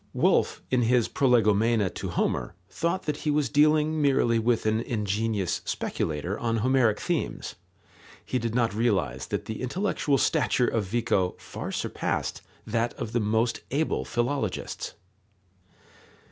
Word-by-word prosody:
Wolf, - - +2
in 130 -1 +3
his 120 0 +3
prolegomena 115 -4 +3
to - - -5
Homer, - - -1
thought 170 - -2
that 150 -1 -2
he 155 - -2
was 145 -3 +1
dealing 155 +2 +3
merely 125 -5 +3
with 115 0 +1
an 110 +1 +2
ingenious 105 -3 -1
speculator 80 +6 -2
on 115 -1 0
Homeric 120 -2 +2
themes. 175 -4 -2 0.7
He 130 - -1
did 115 -1 -3
not 115 -4 +2
realize 95 - 0
that - - -3
the 110 - -5
intellectual 145 0 0
stature 125 - +2
of 110 -3 0
Vico 100 -3 0
far - - -7
surpassed - - -2 0.2
that 115 +2 -1
of 110 - -5
the 120 - +1
most 110 +2 +1
able 150 +4 0
philologists. 120 -3 -2
115 Hz, 135 wpm, -27 LUFS, 110-135 Hz, 0.7 s, in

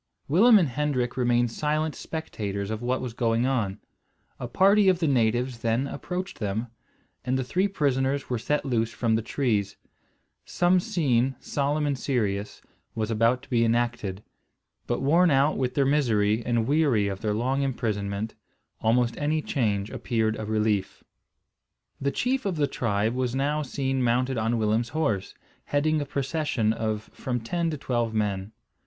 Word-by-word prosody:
Willem 215 - +6
and 170 -8 +2
Hendrik 125 -2 -1
remained 120 -2 +2
silent 155 +4 -1
spectators 105 -10 -4
of 110 0 -4
what 125 +1 -1
was 125 -3 -5
going 115 0 +1
on. 115 -7 0 0.6
A 125 - -4
party 195 - +4
of 185 - +3
the 170 - -1
natives 120 -1 +1
then 115 +3 0
approached 180 +6 -5
them, 110 +3 -2 0.5
and 130 +1 0
the 130 - -1
three 185 +10 +1
prisoners 140 -6 0
were 125 -2 -2
set 150 +6 -1
loose 115 -4 0
from 115 -2 0
the 110 - +2
trees. 110 -5 -1 0.7
Some 180 +1 +2
scene, 135 - +1
solemn 145 +1 -1
and 145 -1 0
serious, 105 -6 -2 0.3
was 110 0 -2
about 115 +4 +2
to - - -16
be 115 -2 +3
enacted; 115 -4 -1 0.6
but 120 +2 -1
worn 170 +6 +4
out 140 +1 +3
with 125 -1 -1
their 140 - +3
misery, 115 -6 +2
and 120 -2 0
weary 135 -7 +2
of 95 -1 -4
their 105 -1 0
long 130 +5 0
imprisonment, 110 -5 -2 0.5
almost 120 +1 +2
any 155 +1 0
change 105 -9 -1
appeared 110 -3 -1
a 110 - -4
relief. 105 -3 -1 1.0
The 140 - +1
chief 255 - -1
of 190 - -1
the 150 -2 +2
tribe 110 -5 -1
was 125 -1 -1
now 145 +3 0
seen 135 -2 -2
mounted 125 +1 +1
on 115 +2 0
Willem's 110 +2 +1
horse, 110 -12 -1 0.3
heading 155 +1 +1
a 145 - -4
procession 135 -5 0
of 110 -1 -3
from 125 -2 -3
ten 165 +9 -1
to 155 - -3
twelve 120 -4 -1
men. 100 -1 -1
125 Hz, 160 wpm, -26 LUFS, 110-145 Hz, 1.0 s, Willem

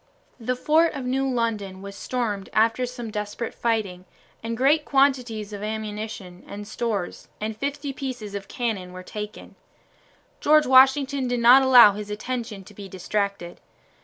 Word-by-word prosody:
The 250 +2 -2
fort 315 +6 +3
of 265 - -5
New 265 +2 0
London 215 -6 -2
was 200 0 -8
stormed 210 -5 -3
after 225 +3 +2
some 240 -2 -7
desperate 210 +2 -4
fighting, 205 -6 -2 0.4
and 230 0 -4
great 290 +5 +3
quantities 250 -7 +1
of 200 - -6
ammunition 210 -3 -6
and 205 +1 -8
stores 215 -5 -3
and 215 +1 -3
fifty 280 +3 -4
pieces 250 -7 -6
of 200 -1 -6
cannon 185 -7 -4
taken. 210 +2 -8 0.9
General 305 -1 +4
Washington 265 0 +5
did 245 0 -1
not 245 +3 +7
allow 250 -5 +8
his 205 +1 -7
attention 220 -1 -5
to 205 - -15
be 200 -1 -10
distracted. 200 -1 -3
225 Hz, 145 wpm, -24 LUFS, 205-255 Hz, 0.9 s, allow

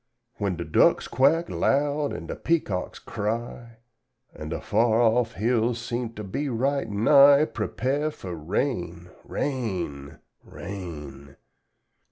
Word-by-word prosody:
"When 100 -3 -1
da 85 - -4
ducks - - +3
quack 160 +6 +3
loud 145 +1 +1
an' - - -6
da - - -5
peacocks 130 - -1
cry, 115 +2 -5 0.6
An' 75 - -8
da 80 - -3
far 110 +1 +2
off 120 0 +2
hills 115 +2 0
seems 120 0 -4
to 105 - -6
be 140 +9 -3
right 135 +2 0
nigh, 140 +7 +6
Prepare 135 +5 -2
fuh 95 -11 -8
rain, 85 - -3
rain, 90 - -3 0.3
rain! 75 -7 -9
115 Hz, 120 wpm, -25 LUFS, 90-135 Hz, 0.6 s, nigh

